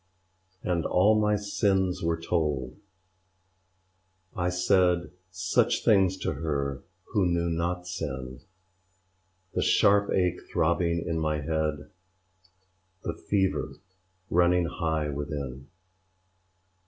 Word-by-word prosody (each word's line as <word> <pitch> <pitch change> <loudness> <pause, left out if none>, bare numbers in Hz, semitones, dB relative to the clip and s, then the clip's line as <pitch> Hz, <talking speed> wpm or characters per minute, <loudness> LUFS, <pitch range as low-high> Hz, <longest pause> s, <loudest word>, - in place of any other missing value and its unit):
And 85 -2 0
all 95 +7 +4
my 105 0 +2
sins 95 -2 0
were 85 0 0
told; 75 -7 -1 1.6
I 90 -2 0
said 90 -1 +2 0.2
Such 95 -1 +1
things 95 -3 +4
to - - -1
her 70 -2 -2 0.3
who 100 -5 +3
knew 85 -1 0
not 85 +2 -1
sinŚ 65 -7 -6 1.1
The - - 0
sharp 100 0 +4
ache 90 -1 +1
throbbing 85 0 +1
in 80 -1 -1
my 75 -1 -1
head, 75 -1 -2 1.1
The - - -2
fever 95 -2 -1 0.6
running 90 0 +4
high 80 -3 -1
within. 70 -2 -5
85 Hz, 100 wpm, -27 LUFS, 75-90 Hz, 1.6 s, all